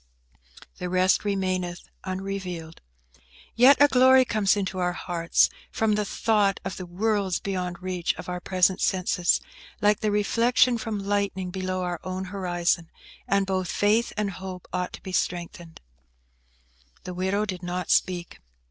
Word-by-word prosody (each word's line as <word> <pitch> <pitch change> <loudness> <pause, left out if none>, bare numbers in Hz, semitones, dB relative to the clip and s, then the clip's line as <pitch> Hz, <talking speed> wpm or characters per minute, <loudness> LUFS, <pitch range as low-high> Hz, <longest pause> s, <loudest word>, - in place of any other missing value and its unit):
"'The 180 - -3
rest 185 +1 +3
remaineth 185 -3 -2 0.2
unrevealed.' 185 -3 -5 0.7
Yet 260 +4 +7
a 290 - +8
glory 260 -1 +6
comes 210 -4 +2
into 190 -2 -2
our 180 0 0
hearts 170 -1 +2 0.2
from 220 -1 +1
the 210 0 0
thought 205 -1 +1
of 190 - -4
the 185 - -7
worlds 195 0 0
beyond 180 -2 -4
reach 180 -2 -1
of - - -9
our 180 0 -3
present 185 +1 +2
senses, 180 -2 +2 0.4
like 210 0 +3
the 215 - 0
reflection 230 +4 +3
from 210 -3 -4
lightning 200 -2 -1
below 185 0 -3
our 175 -1 -3
own 185 0 -4
horizon, 175 -3 0 0.4
and 200 0 +2
both 185 -2 -1
faith 215 +3 +2
and 210 -2 0
hope 185 -1 -8
ought 180 0 -2
to - - -10
be 190 - -6
strengthened." 175 -2 -3 1.2
The 180 - -6
widow 190 +3 0
did 185 -4 -5
not 180 0 -3
speak. 175 -2 0
185 Hz, 150 wpm, -26 LUFS, 180-205 Hz, 1.2 s, a